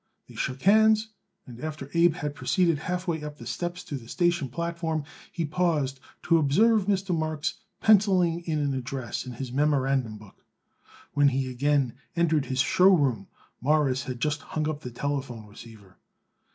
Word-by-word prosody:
They - - -14
shook 130 +1 -4
hands, 220 +2 +5 0.4
and 120 -2 -11
after 150 -3 -6
Abe 170 -1 +4
had 145 -1 -4
proceeded 170 0 +1
half 180 +3 -3
way 160 -3 -1
up 150 0 -7
the - - -11
steps 175 0 -4
to 145 - -5
the 115 -3 -12
station 175 -6 +1
platform 165 +1 -3 0.3
he 170 - -2
paused 150 -5 0 0.2
to 165 -1 +4
observe 205 +8 +3
Mr. 195 -3 +1
Marks 155 0 -2 0.2
penciling 185 -5 +4
an 145 -3 0
address 130 -2 -4
in 125 - -6
his 125 +1 -6
memorandum 135 -5 +1
book. 105 -2 -17 0.7
When 145 0 +4
he 135 -1 0
again 140 -1 +1 0.2
entered 160 -4 +2
his 130 -1 +1
show 180 +8 +5
room 135 - +2 0.3
Morris 140 -1 +2
had 125 -2 -5
just 145 +2 -1
hung 155 -1 -3
up 150 -1 -3
the 125 - -6
telephone 130 -3 -4
receiver. 105 -2 -14
150 Hz, 165 wpm, -27 LUFS, 130-170 Hz, 0.7 s, hands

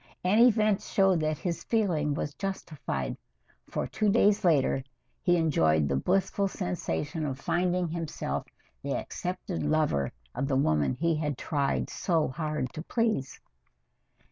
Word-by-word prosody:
And 200 +5 +4
events 215 -4 +4
showed 195 -3 +3
that 155 -1 0
his 170 0 -3
feeling 165 -10 +1
was 145 - -3
justified, 145 - -4 0.5
for - - -2
two 215 -1 0
days 210 -1 +4
later 140 -6 +3 0.4
he 175 -2 +3
enjoyed 80 - +3
the 70 - 0
blissful 195 - +1
sensation 140 - -3
of 135 -3 -2
finding 180 +4 +1
himself 155 - -3 0.3
the - - -2
accepted 180 0 -4
lover 150 - +1 0.2
of 135 +3 -2
the 135 - +1
woman 75 - +2
he 165 -1 +1
had 150 -4 -2
tried 140 -3 0
so 165 -4 +1
hard 150 -2 -3
to 155 - -5
please. 215 - -1
155 Hz, 140 wpm, -29 LUFS, 135-185 Hz, 0.5 s, And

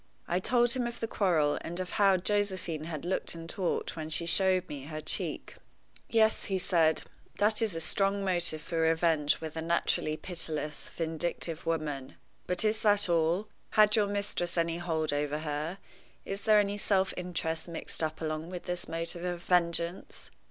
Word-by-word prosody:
I 175 - +1
told 240 +4 +3
him 245 -1 0
of 235 - -7
the 225 - -2
quarrel, 165 -9 +2
and 175 +2 -5
of 185 -1 -4
how 195 -2 +4
Josephine 185 -5 -1
had 160 -1 -5
looked 180 -1 -1
and 165 0 -8
talked 180 +1 -2
when 155 -1 -5
she 165 +1 +1
showed 185 +1 +3
me 140 -2 -7
her 155 +1 -5
cheek. 155 - -3 0.5
"Yes," 220 -1 +3
he 195 - 0
said, 165 -4 +2 0.3
"that 210 +1 +3
is 215 -6 +1
a - - -2
strong 195 +4 +1
motive 175 -4 0
for 165 - -3
revenge 160 -2 +2
with 160 -1 -6
a 160 - -2
naturally 160 -2 0
pitiless, 155 -4 -2
vindictive 165 0 -1
woman. 150 -5 -2 0.3
But 180 +4 +1
is 215 +1 +1
that 205 -3 +3
all? 170 +5 +2 0.3
Had 215 -1 +6
your 210 -2 +3
mistress 200 -4 -2
any 165 0 +1
hold 160 -3 -1
over 145 0 -1
her? 155 +3 -3 0.5
Is 195 +1 -5
there 215 -1 +6
any 205 0 0
self 190 -2 +1
interest 165 -2 -3
mixed 170 -1 -3
up 155 0 -2
along 155 +1 -3
with 180 -1 -6
this 180 -1 -3
motive 165 +1 -4
of 175 -1 -3
vengeance? 170 0 0
170 Hz, 175 wpm, -30 LUFS, 160-195 Hz, 0.5 s, Had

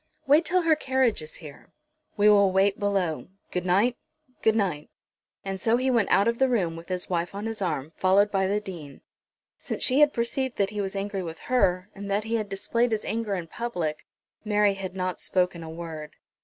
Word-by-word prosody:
"Wait 295 +4 +5
till 365 +2 +1
her 325 -1 +4
carriage 260 - +1
is 155 0 -9
here." 150 -5 -12 0.5
"We 205 0 +4
will 200 -2 +6
wait 195 +2 +2
below. 195 -6 -1 0.2
Good 180 0 -2
night, 210 +8 +3 0.4
good 220 0 +3
night." 180 -9 -1 0.6
And 195 -1 -4
so 230 +1 +3
he 260 +1 +1
went 230 -5 +2
out 200 +3 +4
of 235 0 0
the 265 0 +4
room 185 -9 0
with 165 +1 -10
his 180 -1 -2
wife 175 +1 -2
on 205 +2 -4
his 225 -2 -4
arm, 155 -5 -2
followed 200 +2 +3
by 190 -1 +1
the 205 +2 +1
Dean. 170 -9 -9 0.6
Since - - -5
she 260 +2 +2
had 295 -1 +6
perceived 250 +2 -2
that 200 0 +1
he 210 -1 -2
was 195 0 -4
angry 195 0 -2
with 165 -2 -6 0.2
her, 185 -5 +2
and 200 0 -7
that 200 +2 +1
he 225 +1 -4
had 215 -2 -4
displayed 230 +5 0
his 220 -1 -1
anger 220 -3 -2
in 175 -3 -4
public 165 -6 -4 0.4
Mary 210 -1 +3
had 190 -1 -6
not 185 -1 -2
spoken 180 -2 0
a 160 - -7
word. 160 -2 -7
200 Hz, 210 wpm, -26 LUFS, 180-225 Hz, 0.6 s, will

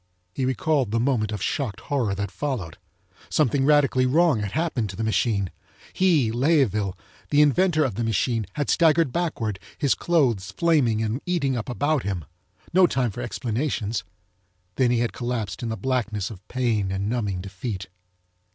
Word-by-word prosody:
He 130 - -1
recalled 130 0 +1
the 115 +2 0
moment 115 -4 +1
of 105 -2 -3
shocked 110 -8 -2
horror 120 -9 -1
that 100 0 -3
followed. 110 - -4 0.5
Something 135 -2 +2
radically 140 -3 +4
wrong 155 -2 +3
had 100 -2 -4
happened 155 -10 -1
to 95 - -7
the 110 - -3
machine. 110 -4 +1 0.4
He, 160 -12 +3
Layeville, 120 - +1 0.3
the 150 0 +5
inventor 155 +2 +3
of 125 - -2
the 120 +4 -2
machine, 115 0 0
had 145 -2 -1
staggered 160 -3 +4
backward, 115 - -2 0.2
his 140 -4 +2
clothes 125 - +1
flaming 135 -10 +2
and 110 +5 -2
eating 145 -7 +1
up 120 +1 -4
about 145 +3 +1
him. 95 -7 -3 0.5
No 185 0 +6
time 125 -7 0
for 120 - -6
explanations. 115 -4 -2 0.7
Then 125 +5 +2
he 120 -1 +2
had 120 - -1
collapsed 120 -4 -3
in 120 - -3
the 110 - -3
blackness 110 -3 -1
of 100 -3 -12
pain 115 -6 0
and 95 +1 -2
numbing 105 -6 -1
defeat. 95 +1 -5
120 Hz, 165 wpm, -24 LUFS, 105-145 Hz, 0.7 s, No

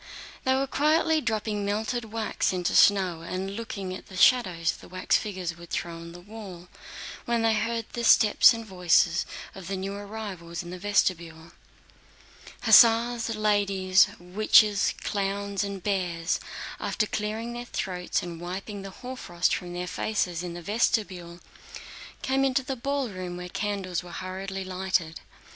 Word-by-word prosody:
They 260 0 +3
were 270 +1 +1
quietly 310 +3 +2
dropping 215 -3 -1
melted 220 +4 -1
wax 220 0 -1
into 180 -1 -1
snow 185 -5 +4
and 185 +3 -4
looking 200 -5 -5
at 185 - -9
the 190 - -10
shadows 180 -8 +4
the - - -12
wax 185 0 0
figures 185 -5 -2
would 170 0 -13
throw 170 - -3
on 165 0 -9
the 175 - -11
wall, 185 -3 -10 0.6
when 235 -1 +1
they 225 -1 +4
heard 230 +1 -1
the 240 - -3
steps 220 -2 +7
and 230 -1 -4
voices 180 -2 +2 0.3
of 190 -2 -9
new 195 0 -3
arrivals 200 -5 -6
in 175 - -9
the 180 - -7
vestibule. 170 -5 0 1.1
Hussars, 230 +1 +6
ladies, 200 -3 +3
witches, 205 +3 +4
clowns, 200 0 -1
and 200 -2 -5
bears, 175 -4 -1 0.4
after 215 - 0
clearing 220 +3 -3
their 240 0 -6
throats 180 -6 -2
and 170 -1 -7
wiping 195 +3 -5
the 195 - -7 0.2
hoarfrost 180 -9 -1
from 175 -2 -4
their 180 0 -3
faces 180 -3 -1
in 175 -1 -5
the 175 - -8
vestibule, 185 -5 -1 0.8
came 265 +1 +1
into 265 0 +2
the 270 0 -3
ballroom 235 -10 -3
where 180 0 -7
candles 195 -3 -2
were 175 - -12
hurriedly 190 +1 -5
lighted. 185 -3 -1
195 Hz, 150 wpm, -27 LUFS, 180-220 Hz, 1.1 s, steps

